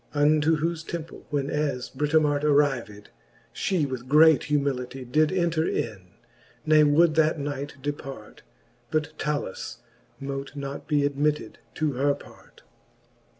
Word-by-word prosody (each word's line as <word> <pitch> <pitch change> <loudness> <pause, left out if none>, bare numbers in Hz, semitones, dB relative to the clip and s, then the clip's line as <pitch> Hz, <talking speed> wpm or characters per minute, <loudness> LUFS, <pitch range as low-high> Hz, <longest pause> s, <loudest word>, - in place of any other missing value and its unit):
Unto 155 +2 +3
whofe 165 +1 -2
temple 165 -1 -7
when 145 -1 -1
as 145 -4 -2
Britomart 150 +1 +1
Arrived, 135 -9 +1 0.4
flie 180 -6 0
with 130 -2 -6
great 155 +1 +6
humility 135 -3 -1
Did 155 +5 +2
enter 170 -3 +1
in, 95 -6 -4 0.5
ne 155 -1 +6
would 155 +3 +4
that 160 0 +3
night 145 0 -4
depart 145 -2 -6 0.2
\ - - -37
But 155 0 -1
Talus 150 -10 -3 0.4
mote 135 +1 -5
not 140 -1 -6
be 145 -2 +2
admitted 145 +1 -1 0.2
to 155 -2 0
her 140 +2 +1
part. - - -17
145 Hz, 130 wpm, -26 LUFS, 135-155 Hz, 0.5 s, great